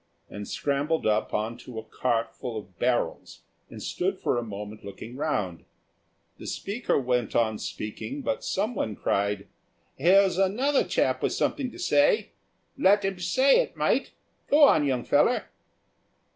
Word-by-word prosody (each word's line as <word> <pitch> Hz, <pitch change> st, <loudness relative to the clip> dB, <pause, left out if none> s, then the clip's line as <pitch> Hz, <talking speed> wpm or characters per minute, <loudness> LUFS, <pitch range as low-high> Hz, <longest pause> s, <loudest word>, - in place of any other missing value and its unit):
and 105 Hz, 0 st, -7 dB
scrambled 145 Hz, +3 st, -1 dB
up 110 Hz, 0 st, +1 dB
on 110 Hz, +2 st, -2 dB
to 120 Hz, -1 st, -11 dB
a 110 Hz, -, -4 dB
cart 115 Hz, 0 st, -1 dB
full 120 Hz, -3 st, -5 dB
of 95 Hz, -4 st, -10 dB
barrels 125 Hz, -1 st, -1 dB, 0.3 s
and -, -, -9 dB
stood -, -, -2 dB
for -, -, 0 dB
a 120 Hz, -, 0 dB
moment 105 Hz, 0 st, -8 dB
looking 110 Hz, +4 st, -9 dB
round. 105 Hz, -, -2 dB, 0.8 s
The -, -, -8 dB
speaker 210 Hz, -, -1 dB
went 125 Hz, -3 st, -1 dB
on 110 Hz, -2 st, +2 dB
speaking, 260 Hz, -, -5 dB
but 280 Hz, -, -2 dB
someone 195 Hz, -, -1 dB
cried, 100 Hz, +1 st, -1 dB, 0.5 s
"Here's 190 Hz, +1 st, +4 dB
another 250 Hz, +9 st, +2 dB
chap -, -, +1 dB
with -, -, 0 dB
something 270 Hz, -4 st, -1 dB
to -, -, -12 dB
say. 350 Hz, +1 st, +2 dB, 0.5 s
Let 205 Hz, -5 st, +4 dB
'im 195 Hz, -2 st, -2 dB
say 260 Hz, -, +4 dB
it, -, -, -2 dB
mate; -, -, +1 dB, 0.4 s
go 295 Hz, +1 st, +6 dB
on, 155 Hz, -, +6 dB
young 125 Hz, -3 st, 0 dB
feller." -, -, +2 dB
130 Hz, 150 wpm, -27 LUFS, -, 0.8 s, go